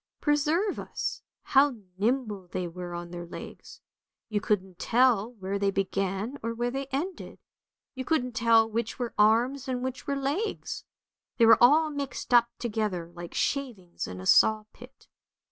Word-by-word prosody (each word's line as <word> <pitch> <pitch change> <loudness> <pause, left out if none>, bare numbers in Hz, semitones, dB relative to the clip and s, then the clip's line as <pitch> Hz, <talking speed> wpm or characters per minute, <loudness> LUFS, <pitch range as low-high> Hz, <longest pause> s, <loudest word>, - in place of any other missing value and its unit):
Preserve 305 +7 +1
us, - - -4 0.2
how 275 -1 +4 0.2
nimble 210 -2 -1
they 180 0 -3
were 175 0 -7
on 175 0 -7
their 175 -1 -7
legs, - - -10 0.5
you 210 -2 -1
couldn't 190 -4 -1
tell 240 -2 +3
where 200 -2 -4
they 200 0 +2
began, 195 +5 -2
or 230 +1 -3
where 240 +1 -1
they 270 +1 -4
ended, 310 +8 -4 0.6
you 260 -1 -5
couldn't 255 -4 0
tell 230 -1 +4
which 230 +1 -3
were 245 -2 -3
arms 245 +6 +3
and 255 -1 -2
which 260 0 -5
were 280 - 0
legs, 290 +11 -3 0.5
they 230 - +6
were 225 +1 +7
all 305 +5 +6
mixed 280 -3 -4
up 235 -1 +6
together 210 -7 -2
like 175 0 -9
shavings 235 -11 -2
in 90 0 -7
a 95 - -8
saw 215 - +5
pit. 250 +3 -16
230 Hz, 160 wpm, -28 LUFS, 195-270 Hz, 0.6 s, were